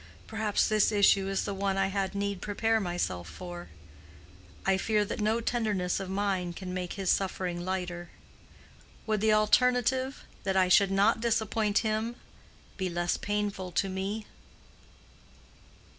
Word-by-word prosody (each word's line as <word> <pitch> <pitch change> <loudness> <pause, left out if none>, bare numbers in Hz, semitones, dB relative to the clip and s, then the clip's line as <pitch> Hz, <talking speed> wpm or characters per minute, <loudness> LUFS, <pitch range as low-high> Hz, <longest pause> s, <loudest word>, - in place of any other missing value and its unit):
Perhaps 220 -2 0
this 215 0 +3
issue 200 -1 +4
is 195 0 0
the 200 - -2
one 195 0 -1
I 195 - +3
had 195 0 -2
need 200 -1 -2
prepare 225 +2 +1
myself 175 - -2
for. 175 - -8 1.0
I 195 - +4
fear 210 +1 +1
that 210 - -4
no 220 +2 +2
tenderness 210 -7 0
of 195 -1 -5
mine 190 -3 -1
can 180 +1 -6
make 180 -1 -3
his 195 -2 0
suffering 180 -2 -1
lighter. 175 -2 -3 1.0
Would 215 -2 0
the 220 0 +4
alternative—that 250 -1 +1
I 185 -1 +4
should 195 +1 +6
not 205 +4 +3
disappoint 220 -2 +1
him—be 215 -3 -5
less 175 0 0
painful 205 -3 -2
to 195 - +1
me?" 195 +3 -3
200 Hz, 135 wpm, -29 LUFS, 185-215 Hz, 1.0 s, should